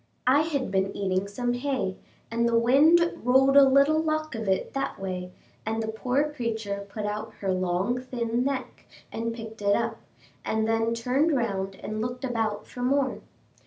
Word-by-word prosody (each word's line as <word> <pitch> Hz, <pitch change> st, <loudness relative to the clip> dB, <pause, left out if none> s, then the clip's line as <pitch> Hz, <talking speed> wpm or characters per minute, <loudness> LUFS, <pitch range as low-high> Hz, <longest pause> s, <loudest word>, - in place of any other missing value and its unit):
I 260 Hz, +3 st, +5 dB
had 285 Hz, -8 st, -2 dB
been 195 Hz, 0 st, 0 dB
eating 190 Hz, 0 st, 0 dB
some 245 Hz, +4 st, -2 dB
hay, 245 Hz, -7 st, -2 dB, 0.4 s
and 235 Hz, +1 st, +1 dB
the 230 Hz, -, +3 dB
wind 310 Hz, +9 st, +4 dB
rolled 265 Hz, +3 st, +4 dB
a 280 Hz, -, +9 dB
little 280 Hz, +4 st, +4 dB
lock 310 Hz, -1 st, -1 dB
of 225 Hz, -3 st, -4 dB
it 190 Hz, -, 0 dB
that 275 Hz, 0 st, -2 dB
way, 180 Hz, -1 st, -4 dB, 0.3 s
and 220 Hz, +1 st, -2 dB
the 220 Hz, -, -3 dB
poor 255 Hz, +7 st, 0 dB
creature 220 Hz, -6 st, -3 dB
put 210 Hz, +1 st, -5 dB
out 210 Hz, +1 st, -4 dB
her 195 Hz, -2 st, 0 dB
long 185 Hz, +6 st, 0 dB
thin 240 Hz, -1 st, -2 dB
neck 270 Hz, -1 st, -4 dB, 0.2 s
and 230 Hz, +1 st, -2 dB
picked 225 Hz, -2 st, -8 dB
it 200 Hz, 0 st, +3 dB
up, 230 Hz, -1 st, -1 dB, 0.5 s
and 220 Hz, 0 st, 0 dB
then 225 Hz, +1 st, +1 dB
turned 270 Hz, +6 st, +1 dB
round 195 Hz, -5 st, -2 dB
and 215 Hz, +2 st, -5 dB
looked 245 Hz, +3 st, -4 dB
about 220 Hz, -4 st, -2 dB
for 245 Hz, -, -9 dB
more. 265 Hz, +2 st, +1 dB
230 Hz, 175 wpm, -26 LUFS, 210-265 Hz, 0.5 s, a